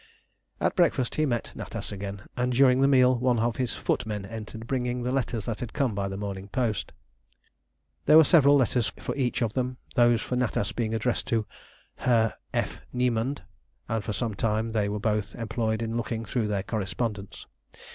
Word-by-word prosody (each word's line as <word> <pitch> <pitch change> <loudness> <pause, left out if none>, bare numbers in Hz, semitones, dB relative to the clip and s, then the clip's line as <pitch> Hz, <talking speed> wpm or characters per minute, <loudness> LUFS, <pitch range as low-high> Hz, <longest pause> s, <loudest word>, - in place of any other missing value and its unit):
At - - +1
breakfast 125 -2 +2
he 155 0 +1
met 120 -3 -2
Natas - - -6
again, 100 0 -6
and 125 0 0
during 130 0 +5
the 135 - +5
meal 130 -2 +5
one 125 -1 +2
of 115 0 0
his 125 -2 -1
footmen 105 -3 -2
entered, 110 +1 -7
bringing 125 -1 -1
the 125 - -1
letters 120 -5 -1
that 115 -2 -3
had 120 - -5
come 135 -6 +1
by 100 0 -1
the 95 0 -5
morning 100 -1 -5
post. 115 -3 -1 1.2
There 155 - +8
were 160 - +9
several 145 -3 +6
letters 125 -4 +2
for - - -4
each 130 -2 0
of 110 -2 -1
them, 125 -1 -2 0.2
those 120 -1 +4
for 125 - -3
Natas 105 -4 0
being 115 -2 -1
addressed 115 +2 -1
to 115 -2 +1 0.5
"Herr 115 -3 +2 0.2
F. - - -2
Niemand," 125 +1 0 0.4
and 110 -2 -1
for 105 - -3
some 110 +1 -1
time 110 +2 0
they 105 -2 0
were 105 +1 -2
both 105 -2 -1
employed 110 -1 -1
in 115 0 -3
looking 115 -1 -2
through 115 -3 -1
their 100 -2 -1
correspondence. 105 -1 -3
115 Hz, 185 wpm, -27 LUFS, 105-125 Hz, 1.2 s, were